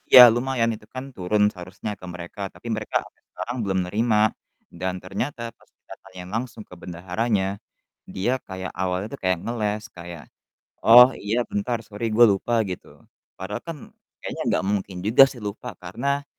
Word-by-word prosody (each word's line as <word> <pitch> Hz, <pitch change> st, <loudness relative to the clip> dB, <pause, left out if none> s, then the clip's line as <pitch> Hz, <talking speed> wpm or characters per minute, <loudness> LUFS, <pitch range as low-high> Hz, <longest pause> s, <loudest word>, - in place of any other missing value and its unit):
Iya 125 Hz, -, +12 dB
lumayan, 120 Hz, -1 st, +1 dB
itu 105 Hz, -1 st, -10 dB
kan 130 Hz, 0 st, -6 dB
turun 105 Hz, +3 st, +1 dB
seharusnya 90 Hz, +3 st, -6 dB
ke -, -, -10 dB
mereka, 90 Hz, +2 st, -8 dB
tapi -, -, -12 dB
mereka 110 Hz, 0 st, -5 dB
sampai -, -, -19 dB
sekarang 120 Hz, +1 st, -5 dB
belum 95 Hz, -2 st, 0 dB
nerima. 110 Hz, +2 st, +2 dB, 0.4 s
Dan 95 Hz, +2 st, -3 dB
ternyata 115 Hz, +5 st, -4 dB
pas -, -, -26 dB
kita -, -, -14 dB
tanyain 90 Hz, -1 st, -10 dB
langsung 115 Hz, 0 st, -4 dB
ke -, -, -15 dB
bendaharanya, 95 Hz, +3 st, -1 dB, 0.5 s
dia 120 Hz, +8 st, 0 dB
kayak 95 Hz, -1 st, -5 dB
awalnya 95 Hz, +1 st, -1 dB
tuh 140 Hz, -, -6 dB
kayak 95 Hz, -1 st, +2 dB
ngeles, 110 Hz, -2 st, -1 dB
kayak, 85 Hz, -3 st, -9 dB, 0.6 s
"Oh, 125 Hz, +3 st, +9 dB
iya 110 Hz, +4 st, 0 dB
bentar 115 Hz, +4 st, -1 dB
sorry 110 Hz, +3 st, -4 dB
gua 120 Hz, +2 st, +8 dB
lupa," 100 Hz, +5 st, -1 dB
gitu. 90 Hz, -3 st, -8 dB, 0.3 s
Padahal 95 Hz, +3 st, -5 dB
kan 165 Hz, -2 st, -4 dB, 0.5 s
kayaknya -, -, -4 dB
nggak -, -, 0 dB
mungkin 100 Hz, -2 st, -2 dB
juga 110 Hz, +6 st, +7 dB
sih 120 Hz, -4 st, -11 dB
lupa, 105 Hz, -1 st, -6 dB
karena 140 Hz, +3 st, -2 dB
105 Hz, 165 wpm, -24 LUFS, 95-120 Hz, 0.6 s, Iya